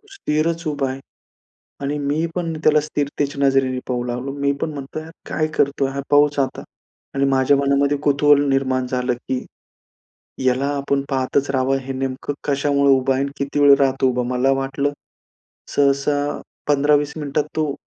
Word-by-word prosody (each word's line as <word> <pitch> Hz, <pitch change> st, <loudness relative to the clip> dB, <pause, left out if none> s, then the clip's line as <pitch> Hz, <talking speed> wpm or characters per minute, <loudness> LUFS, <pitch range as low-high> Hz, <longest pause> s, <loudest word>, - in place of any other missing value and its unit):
तो 420 Hz, -, -27 dB
स्थिरच 165 Hz, -, -1 dB
उभा 145 Hz, -3 st, -1 dB
आहे. 135 Hz, -, -6 dB, 0.8 s
आणि 145 Hz, +1 st, -2 dB
मी 145 Hz, +3 st, 0 dB
पण 170 Hz, -2 st, -2 dB
त्याला 155 Hz, 0 st, +5 dB
स्थिरतेच्या 145 Hz, -1 st, -2 dB
नजरेने 135 Hz, -1 st, +2 dB
पाहू 125 Hz, -1 st, -1 dB
लागलो. 125 Hz, +2 st, -4 dB
मी 140 Hz, 0 st, 0 dB
पण 155 Hz, -, -2 dB
म्हणतो, 140 Hz, +2 st, -6 dB
हा 160 Hz, -, -11 dB, 0.2 s
काय 155 Hz, -, 0 dB
करतोय 140 Hz, -1 st, +1 dB
हा 140 Hz, +1 st, -3 dB
पहुच 145 Hz, 0 st, +4 dB
आता. 135 Hz, -1 st, -1 dB, 0.5 s
आणि 135 Hz, 0 st, +2 dB
माझ्या 135 Hz, +1 st, +3 dB
मनामध्ये 140 Hz, +1 st, +2 dB
कुतूहल 145 Hz, 0 st, +4 dB
निर्माण 130 Hz, -1 st, +1 dB
झालं, 125 Hz, 0 st, -1 dB
की 125 Hz, +1 st, -4 dB, 1.0 s
याला 130 Hz, +2 st, +2 dB
आपण 140 Hz, 0 st, 0 dB
पाहतच 135 Hz, +1 st, 0 dB
राहावं. 135 Hz, 0 st, +1 dB
हे 135 Hz, 0 st, -6 dB
नेमकं 135 Hz, +2 st, -3 dB
कशामुळे 140 Hz, -1 st, +3 dB
उभं 130 Hz, 0 st, +1 dB
आहे 130 Hz, -, 0 dB
आणि 140 Hz, 0 st, -3 dB
किती 140 Hz, +1 st, -1 dB
वेळ 140 Hz, -1 st, +8 dB
राहतो? 135 Hz, -1 st, +2 dB
उभं 125 Hz, 0 st, -1 dB
मला 125 Hz, +2 st, +2 dB
वाटलं, 140 Hz, +1 st, -1 dB, 0.8 s
सहसा 145 Hz, +1 st, +1 dB, 0.3 s
15-20 145 Hz, 0 st, +2 dB
मिनिटात 145 Hz, 0 st, -1 dB
तो 155 Hz, -3 st, 0 dB
140 Hz, 160 wpm, -21 LUFS, 135-145 Hz, 1.0 s, वेळ